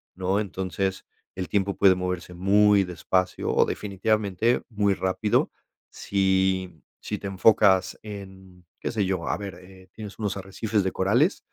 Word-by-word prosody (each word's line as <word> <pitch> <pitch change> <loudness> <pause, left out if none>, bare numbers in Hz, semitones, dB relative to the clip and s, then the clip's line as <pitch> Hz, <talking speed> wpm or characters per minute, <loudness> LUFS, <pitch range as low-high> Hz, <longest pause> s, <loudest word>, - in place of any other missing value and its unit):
¿no?, 95 +2 0
entonces, 95 -1 -3 0.3
el 90 -1 -4
tiempo 100 -1 0
puede 95 -2 +6
moverse 90 -1 -4
muy 100 +2 +4
despacio 90 +1 -1
o - - +5
definitivamente 105 +2 0
muy 100 -3 +1
rápido, 95 +3 0 0.4
si 95 -3 0 0.2
si 105 - -4
te - - -6
enfocas 95 -1 +3
en 95 -3 -11 0.2
¿qué - - -2
sé 105 -4 0
yo? 95 0 -2
A - - 0
ver, 100 -3 -7
eh, 95 0 -16
tienes 105 -1 -9
unos 105 -3 -2
arrecifes 100 +2 -2
de 95 - -1
corales 120 - +2
95 Hz, 145 wpm, -25 LUFS, 95-105 Hz, 0.4 s, puede